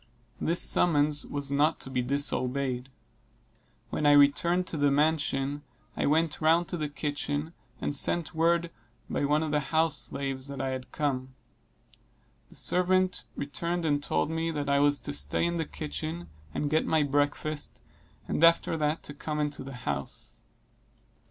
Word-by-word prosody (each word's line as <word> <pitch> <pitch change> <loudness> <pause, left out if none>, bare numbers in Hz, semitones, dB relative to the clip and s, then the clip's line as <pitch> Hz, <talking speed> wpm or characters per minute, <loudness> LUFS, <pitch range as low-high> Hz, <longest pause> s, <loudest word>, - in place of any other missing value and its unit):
This 170 +2 +1
summons 150 -3 +3
was 140 -1 -2
not 150 +3 +2
to 135 - -5
be 125 -1 0
disobeyed. 130 -1 -1 1.0
When 150 - +1
I 145 - +7
returned 160 +5 +4
to 165 - -4
the 145 -1 +3
mansion, 145 -1 +1 0.3
I - - 0
went 160 +2 +1
round 165 +2 +4
to 175 - -2
the 150 -2 -2
kitchen, 145 +1 -3 0.3
and 145 - -2
sent 170 +4 +2
word 170 +1 +2 0.4
by - - 0
one 150 +2 +2
of 155 - -2
the 150 - +2
house 160 +1 +1
slaves 135 -1 -3
that 140 -1 -7
I 135 0 -1
had 130 -1 -5
come. 130 -3 -2 1.1
The - - -16
servant 185 +1 +1
returned 170 +4 -3
and 145 -2 +1
told 80 - 0
me, 165 0 -1
that 145 -3 -3
I 140 - +4
was 145 0 +4
to - - -3
stay 70 - +1
in 170 0 -1
the 160 - -1
kitchen 155 +3 -5 0.2
and 145 - -2
get 155 - +2
my 160 -2 +3
breakfast; 145 +1 -1 0.5
and 160 - -1
after 165 0 +5
that 150 +1 0
to 145 - -6
come 150 +1 -4
into 150 -2 -2
the 135 +1 -8
house. 70 -1 -4
145 Hz, 165 wpm, -28 LUFS, 140-160 Hz, 1.1 s, I